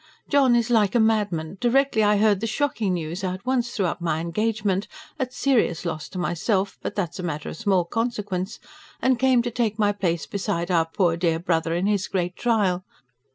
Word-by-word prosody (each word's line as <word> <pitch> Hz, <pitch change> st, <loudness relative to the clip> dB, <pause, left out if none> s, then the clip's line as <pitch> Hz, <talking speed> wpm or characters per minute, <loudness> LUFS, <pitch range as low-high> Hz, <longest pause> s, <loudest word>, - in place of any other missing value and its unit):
JOHN 270 Hz, -4 st, +4 dB
IS 235 Hz, 0 st, +1 dB
LIKE 215 Hz, -2 st, +3 dB
A -, -, +5 dB
MADMAN. 200 Hz, -6 st, 0 dB
DIRECTLY 245 Hz, -1 st, +3 dB
I 210 Hz, 0 st, +4 dB
HEARD 205 Hz, -2 st, +3 dB
THE 225 Hz, -, -2 dB
"SHOCKING" 220 Hz, -6 st, 0 dB
NEWS, 170 Hz, +3 st, -4 dB
I 185 Hz, -1 st, -1 dB
AT 185 Hz, -, -13 dB
ONCE 250 Hz, -2 st, +1 dB
THREW 200 Hz, -, -1 dB
UP 175 Hz, 0 st, -2 dB
MY 160 Hz, -2 st, 0 dB
ENGAGEMENT 200 Hz, +3 st, -1 dB, 0.3 s
AT 255 Hz, -2 st, -2 dB
"SERIOUS" 225 Hz, -, +1 dB
LOSS 155 Hz, -3 st, -4 dB
TO 190 Hz, -, -8 dB
MYSELF, 190 Hz, +3 st, -1 dB
BUT -, -, -4 dB
THAT 180 Hz, -6 st, -1 dB
IS -, -, -10 dB
A -, -, -2 dB
MATTER 150 Hz, -3 st, -4 dB
OF -, -, -7 dB
SMALL 190 Hz, -3 st, +2 dB
CONSEQUENCE 205 Hz, -3 st, -3 dB, 0.4 s
AND 260 Hz, -2 st, +3 dB
CAME 260 Hz, -2 st, +4 dB
TO 240 Hz, -, -3 dB
TAKE 225 Hz, -3 st, -1 dB
MY 205 Hz, -2 st, +3 dB
PLACE 175 Hz, -6 st, -1 dB
BESIDE 190 Hz, -3 st, -2 dB
OUR 165 Hz, -2 st, +3 dB
POOR 170 Hz, 0 st, +1 dB
DEAR 170 Hz, -2 st, +1 dB
BROTHER 165 Hz, -1 st, 0 dB
IN 175 Hz, +2 st, 0 dB
HIS 205 Hz, -2 st, +1 dB
GREAT 180 Hz, -1 st, -2 dB
TRIAL. 200 Hz, -6 st, +1 dB
200 Hz, 205 wpm, -24 LUFS, 175-225 Hz, 0.4 s, A